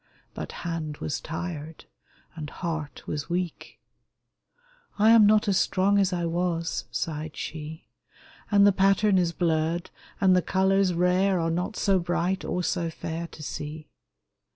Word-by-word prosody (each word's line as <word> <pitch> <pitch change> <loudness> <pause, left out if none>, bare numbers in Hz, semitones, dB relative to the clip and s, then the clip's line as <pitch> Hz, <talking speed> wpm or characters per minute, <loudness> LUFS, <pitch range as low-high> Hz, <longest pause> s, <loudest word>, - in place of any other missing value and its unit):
But - - -6
hand 160 -3 -3
was 150 - -3
tired, 160 -2 -6 0.5
and 150 -3 -6
heart 160 -4 -5
was 150 +1 -4
weak: 175 -1 -4 0.6
" - - -36
I 215 +2 +5
am 225 -2 +8
not 215 0 +4
as 195 -2 +3
strong 200 +2 +2
as 195 -1 +2
I 175 -1 -1
was," 170 0 -1
sighed 155 -1 -4
she, 155 +1 -7 0.3
" - - -25
And 200 -1 +6
the 205 - +7
pattern 195 +1 +3
is 175 -2 +1
blurred, 165 0 0 0.3
and 190 -1 +5
the 180 - +4
colors 190 +2 +2
rare 180 +2 +2
Are 165 0 0
not 180 +5 -2
so 195 -2 +2
bright, 175 +2 -1
or 180 - -2
so 170 -1 -1
fair 165 +1 -5
to 155 - -11
see 150 +2 -6
175 Hz, 155 wpm, -26 LUFS, 160-195 Hz, 0.6 s, am